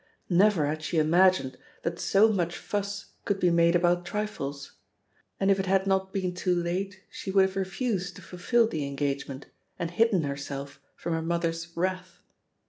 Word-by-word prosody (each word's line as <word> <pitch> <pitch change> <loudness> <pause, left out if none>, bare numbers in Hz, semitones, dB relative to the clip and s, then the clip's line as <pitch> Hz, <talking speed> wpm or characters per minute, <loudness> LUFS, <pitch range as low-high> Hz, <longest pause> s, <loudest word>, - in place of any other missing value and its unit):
Never 185 -3 +4
had 155 +2 -2
she 160 - -2
imagined 160 -4 +3 0.2
that 170 0 -2
so 200 +3 +4
much 175 -4 -1
fuss 205 0 -4
could 200 -1 -1
be 180 -2 +3
made 170 0 +4
about 175 0 +3
trifles; 175 -8 -4 0.7
and 195 0 +3
if 195 - +3
it 190 - -1
had 190 0 +3
not 190 0 +1
been 185 -2 -2
too 180 0 0
late 185 +3 -2
she - - -7
would 190 0 +5
have 190 - -4
refused 190 -1 -2
to - - -12
fulfil 225 +6 +1
the 160 -8 -3
engagement 140 -1 -3 0.3
and 170 -2 -3
hidden 205 -2 +3
herself 140 0 -5
from 170 - -3
her 165 - 0
mother's 165 0 -2
wrath. 185 0 -3
180 Hz, 170 wpm, -28 LUFS, 165-195 Hz, 0.7 s, would